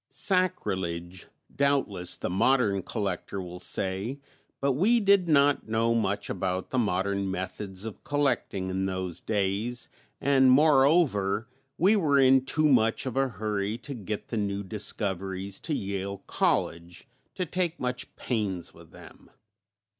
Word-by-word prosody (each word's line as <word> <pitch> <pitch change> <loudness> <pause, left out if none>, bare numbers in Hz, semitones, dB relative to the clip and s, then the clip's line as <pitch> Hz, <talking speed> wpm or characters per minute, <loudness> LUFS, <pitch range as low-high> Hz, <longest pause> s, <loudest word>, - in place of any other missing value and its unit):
Sacrilege, 95 - -1 0.3
doubtless, 135 -11 +1
the - - -3
modern 100 +1 +2
collector 100 -2 -3
will 90 -1 -7
say, 95 +10 -1 0.4
but 140 0 +1
we 200 - +3
did 200 -4 +3
not 145 -3 +3
know 115 +1 +2
much 100 -3 -1
about 95 0 -3
the 130 - +1
modern 100 -2 0
methods 95 +1 -5
of 110 - -8
collecting 130 -10 -1
in 95 +1 -1
those 95 -2 -3
days, 105 +4 -1 0.3
and 135 -1 +4
moreover 135 - +4 0.3
we 195 +5 +4
were 155 -8 +3
in 130 -1 +5
too 155 +3 0
much 115 -5 +3
of 130 - -4
a 135 0 +2
hurry 105 0 -2
to 125 +4 -8
get 105 -3 -5
the 115 - -3
new 100 -1 -2
discoveries 95 -1 -2
to 155 - -3
Yale 100 -1 -4
College 85 +6 -1 0.3
to 185 - -2
take 175 0 -2
much 125 0 -4
pains 100 -8 -3
with - - -16
them. - - -15
105 Hz, 140 wpm, -27 LUFS, 95-135 Hz, 0.4 s, in